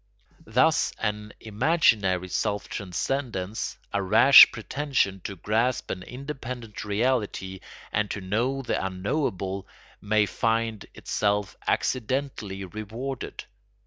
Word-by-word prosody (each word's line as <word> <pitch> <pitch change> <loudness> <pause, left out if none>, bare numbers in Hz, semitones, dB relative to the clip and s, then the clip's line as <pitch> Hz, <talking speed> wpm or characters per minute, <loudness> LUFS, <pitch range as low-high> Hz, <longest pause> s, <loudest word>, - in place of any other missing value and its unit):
Thus 130 +9 +3
an 105 -1 -3
imaginary 105 - +2
self 105 +2 -1
transcendence, 100 +1 -3 0.2
a 100 - +1
rash 110 +8 +9
pretension 120 -4 -1
to 100 - -4
grasp 110 +7 0
an 90 - -4
independent 125 -3 -7
reality 105 -3 -1 0.3
and 105 0 0
to - - -3
know 120 +8 -1
the 120 - -1
unknowable, 95 - -2 0.3
may 105 +1 +2
find 115 0 -1
itself 105 -1 -1
accidentally 125 -6 -1
rewarded. 110 +7 -6
110 Hz, 100 wpm, -26 LUFS, 100-130 Hz, 0.3 s, rash